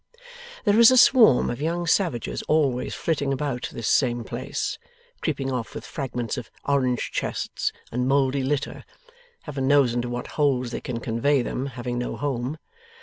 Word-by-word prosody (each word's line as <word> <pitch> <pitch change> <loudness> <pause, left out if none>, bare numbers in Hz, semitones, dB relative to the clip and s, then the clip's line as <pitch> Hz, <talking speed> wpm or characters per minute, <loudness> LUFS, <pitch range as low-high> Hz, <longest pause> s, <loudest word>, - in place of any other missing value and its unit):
There 210 +1 +4
is 235 - +9
a 255 - +4
swarm 235 - +6
of 120 - -6
young 170 +3 -1
savages 165 - 0
always 140 -5 +1
flitting 145 -4 -1
about 135 -2 -2
this 115 - -4
same 120 -3 +2
place, - - -4 0.4
creeping 135 -4 -2
off 120 -6 -4
with - - -6
fragments 125 -5 -4
of 115 - -6 0.2
orange 130 -3 0
chests, - - -2 0.2
and 125 +2 -1
mouldy 135 0 +2
litter 140 +1 -2 0.6
Heaven 135 -3 -3
knows 140 -4 +4
into 120 0 -2
what 120 0 -4 0.2
holes 130 -4 +2
they - - -4
can 120 -2 -4
convey 125 +4 +1
them, 130 +3 -3
having 120 -1 -4
no 125 - -3
home! 135 0 -2
135 Hz, 160 wpm, -24 LUFS, 120-145 Hz, 0.6 s, is